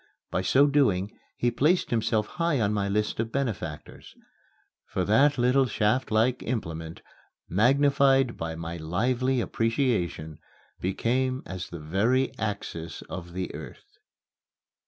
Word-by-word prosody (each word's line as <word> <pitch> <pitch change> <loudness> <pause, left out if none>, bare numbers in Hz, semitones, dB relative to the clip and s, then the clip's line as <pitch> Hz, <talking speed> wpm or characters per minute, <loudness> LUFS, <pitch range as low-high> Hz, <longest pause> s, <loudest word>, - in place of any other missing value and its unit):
By 90 - 0
so 130 +9 +4
doing 115 -9 +2 0.3
he 120 - +1
placed 155 +9 +2
himself 110 -2 +1
high 165 +1 -1
on 105 -2 +1
my 100 -1 0
list 105 +2 -1
of 115 0 -1
benefactors; 110 - -4 0.7
for 95 -2 -2
that 135 +9 +4
little 125 +2 +3
shaftlike 115 +2 +1
implement, 80 -9 -4 0.4
magnified 135 - +3
by 80 0 -4
my 85 +1 -5
lively 125 +11 0
appreciation, 115 - -1 0.4
became 130 +7 0
as 95 -1 -6
the 85 - -7
very 110 +12 +1
axis 85 -6 -4
of 85 -1 -7
the 95 0 -4
earth. - - -11
110 Hz, 120 wpm, -27 LUFS, 90-130 Hz, 0.7 s, so